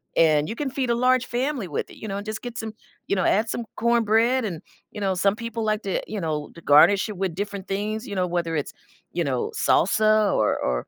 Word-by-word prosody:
and 155 -1 +3
you 225 - -4
can 285 +2 -2
feed 260 -2 -2
a 235 - +3
large 250 0 +3
family 250 -3 -2
with 150 - -3
it, - - -14
you 220 - -7
know, 195 -1 -3
and 200 - -6
just 215 0 -5
get 245 0 -7
some, 220 -3 -5 0.3
you - - +1
know, 185 - 0
add 220 +3 +2
some 235 - -3
corn 235 +1 +2
bread. 230 +4 +2
And, 170 -7 -4 0.3
you 210 - -8
know, 195 -1 +1
some 195 +2 +2
people 230 0 -4
like 215 0 0
to, 195 - -1
you 215 - -4
know, 155 -3 -3
to 170 - -12
garnish 165 +8 +5
it 210 - -6
with 185 -3 -2
different 200 0 -5
things, 210 +3 -3
you 200 - -5
know, 185 -1 +1
whether 170 -2 -1
it's, 150 - -3 0.4
you 175 - 0
know, 130 -5 -1
salsa 215 +2 +3
or 105 - +2
or 60 -1 -2
205 Hz, 250 wpm, -24 LUFS, 175-230 Hz, 0.4 s, garnish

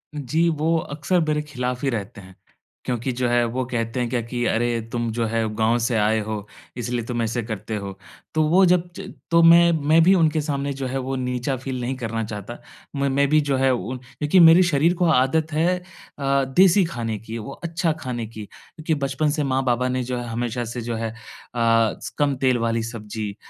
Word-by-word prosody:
जी 155 +4 0
वो 160 +1 +1
अक्सर 155 +4 -1
मेरे 150 0 +1
खिलाफ़ 125 -4 -4
ही - - +2
रहते 105 -3 -5
हैं 95 0 -15 0.5
क्योंकि 125 +1 -2
जो 125 0 -1
है 120 0 +3
वो 125 +3 -2
कहते 115 0 -2
हैं 120 - -1
क्या 120 0 -1
कि 120 +1 -4
अरे! 120 0 0
तुम 120 -1 -2
जो 115 +1 -1
है 115 0 0
गाँव 115 +2 +2
से 120 - -1
आए 110 +1 +2
हो 105 -1 -5 0.3
इसलिए 120 0 -2
तुम 120 -1 -2
ऐसे 115 +1 -1
करते 110 0 -5
हो। 100 -2 -6 0.4
तो 155 0 +2
वो 185 +3 +5
जब 175 0 +2
ज - - -8 0.2
तो 170 - +5
मैं 170 +1 +7 0.2
मैं 160 +2 +6
भी 185 +3 +6
उनके 160 -3 +2
सामने 140 -1 -2
जो 135 -1 -4
है 130 - -3
वो 130 +1 -3
नीचा 125 +1 -2
फ़ील 130 0 -5
नहीं 130 +2 -2
करना 115 -3 -3
चाहता। 105 +2 -7 0.4
म 140 0 0
मैं 140 +1 +2
भी 155 +1 +4
जो 140 -2 0
है 135 0 +3
क्योंकि 130 +7 -1
मेरे 165 +1 +8
शरीर 170 0 +2
को 175 - +5
आदत 155 +2 +2
है 170 +4 +2 0.4
अ, 140 0 +1
देसी 185 +8 +4
खाने 115 -9 -4
की, 115 +2 -7
वो 115 +5 -7
अच्छा 165 0 0
खाने 120 -4 -4
की 110 -1 -9
क्योंकि 155 +8 -5
बचपन 140 +1 -1
से 150 -1 -1
माँ-बाबा 130 -2 0
ने 130 0 -1
जो 125 0 -3
है, 120 0 -5
हमेशा 120 +1 -3
से 120 +1 -5
जो 115 0 -3
है 115 0 -3
अ, - - -14 1.0
कम 145 -2 +1
तेल 130 -2 +3
वाली 115 -1 0
सब्ज़ी, 110 -2 -6
125 Hz, 210 wpm, -23 LUFS, 115-150 Hz, 1.0 s, मेरे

